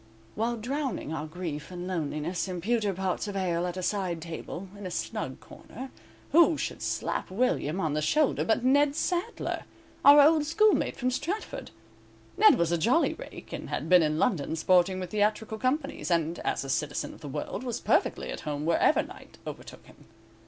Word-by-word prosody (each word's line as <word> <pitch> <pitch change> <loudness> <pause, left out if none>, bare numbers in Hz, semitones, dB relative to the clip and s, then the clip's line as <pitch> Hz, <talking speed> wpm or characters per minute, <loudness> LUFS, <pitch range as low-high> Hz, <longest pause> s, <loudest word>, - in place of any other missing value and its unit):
While 235 +3 -1
drowning 255 - -3
our 155 0 -4
grief 155 -3 -5
and 180 -1 -6
loneliness 170 0 -2
in 180 -1 -4
pewter 215 +2 +1
pots 190 +2 -2
of 205 - -5
ale 180 -2 0
at 180 +1 -5
a 185 - -3
side 185 -4 -1
table, 170 +3 -7
in 200 -2 -7
a - - -5
snug 175 - -4
corner, 265 +1 -10 0.4
who 330 +1 +6
should - - -4
slap - - -2
William 190 - 0
on 160 -5 0
the 155 - 0
shoulder 285 - +2
but 225 - +1
Ned 280 +2 +4
Sadler, 360 +7 -2 0.4
our 285 +1 +9
old 300 +1 +6
schoolmate 425 +7 +3
from 255 0 0
Stratford. 340 - -4 0.7
Ned 430 - +7
was 170 -1 +1
a 170 - +1
jolly 245 - +3
rake, - - -10
and - - -6
had - - -3
been 180 -1 +7
in 155 -1 +1
London 160 - +1
sporting 185 +3 +3
with 180 -2 -5
theatrical 215 +1 0
companies, 275 +2 -1
and, 170 -1 +1
as - - -1
a 135 - -7
citizen 145 +1 -2
of - - -15
the 150 - -7
world, 135 - -4
was 245 -3 -3
perfectly - - +1
at - - -5
home 150 0 -4
wherever 165 0 +3
night - - -13
overtook - - -9
him. - - -18
190 Hz, 185 wpm, -28 LUFS, 170-260 Hz, 0.7 s, our